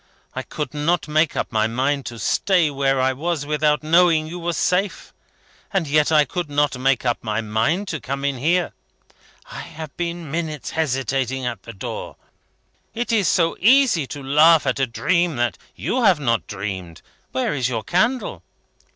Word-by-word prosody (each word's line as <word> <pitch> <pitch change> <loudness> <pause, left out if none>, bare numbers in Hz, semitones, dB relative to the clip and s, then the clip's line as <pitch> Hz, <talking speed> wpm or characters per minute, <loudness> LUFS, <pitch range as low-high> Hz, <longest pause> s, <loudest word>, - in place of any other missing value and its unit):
I - - -3
could 150 -3 -5
not 155 +3 0
make 155 +1 +1
up - - -2
my 110 -2 +2
mind 135 +4 -1
to 120 - -7
stay 170 - +2
where 135 -1 +1
I 130 +1 +2
was 155 +2 -2
without 150 -1 +1
knowing 165 0 +4
you 170 +3 -7
were 170 0 -2
safe; 185 +4 -1 0.6
and 190 -5 0
yet 150 +2 +2
I 150 -1 +5
could 175 +3 -4
not 145 -1 +1
make 130 0 +1
up 120 -1 0
my 110 -1 -1
mind 115 - 0
to 155 - -3
come 140 +2 -4
in 140 -3 -1
here. 170 +6 +1 0.8
I - - -7
have 155 -2 -9
been 170 -3 -4
minutes 155 -3 -3
hesitating 135 -3 -1
at 120 -5 -4
the 115 - -10
door. 95 - -6 0.8
It 240 +1 -2
is 210 -6 +2
so 165 0 +2
easy 230 - +4
to 145 0 -7
laugh 155 +4 +5
at - - 0
a 135 - +2
dream 170 +7 0
that 120 -1 -1 0.2
you 255 - -1
have 190 -7 +5
not 115 - 0
dreamed. 95 -4 -6 0.3
Where 130 +3 -1
is 130 -3 0
your 115 -3 -3
candle?" 225 - 0
150 Hz, 175 wpm, -21 LUFS, 130-170 Hz, 0.8 s, I